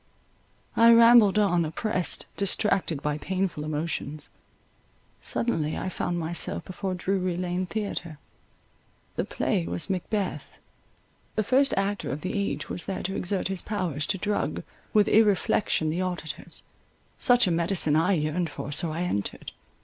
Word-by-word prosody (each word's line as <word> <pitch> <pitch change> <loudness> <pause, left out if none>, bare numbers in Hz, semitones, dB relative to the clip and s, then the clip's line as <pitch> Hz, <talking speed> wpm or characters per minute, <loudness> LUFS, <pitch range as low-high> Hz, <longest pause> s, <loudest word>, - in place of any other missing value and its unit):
I 230 0 +7
rambled 230 -3 +7
on, 185 -5 +3
oppressed, 180 +3 -2
distracted 190 -6 +1
by 150 0 -1
painful 185 -3 -2
emotions—suddenly 155 - -4
I 185 - -3
found 175 -1 -2
myself 170 0 -1
before 185 0 -4
Drury 185 -1 -1
Lane 180 0 -2
Theatre. 180 -6 -4 1.0
The - - -1
play 85 - -1
was 85 - -1
Macbeth—the 200 +2 -5
first 270 +5 +3
actor 200 +1 -1
of 150 - -4
the 185 - -3
age 200 -6 -2
was 175 - -4
there 195 - -4
to 190 +2 -3
exert 185 +1 -1
his 190 -2 -2
powers 180 -9 -2
to 195 - 0
drug 205 +2 -2 0.3
with 210 -2 +4
irreflection 205 -6 +3
the 175 +3 -1
auditors; 180 -4 -5 0.6
such 245 -1 +5
a 180 - +1
medicine 165 -2 +3
I 165 +5 +3
yearned 160 +1 0
for, - - -6
so 160 +3 0
I 165 +3 -2
entered. 100 - -3
180 Hz, 135 wpm, -26 LUFS, 160-200 Hz, 1.0 s, I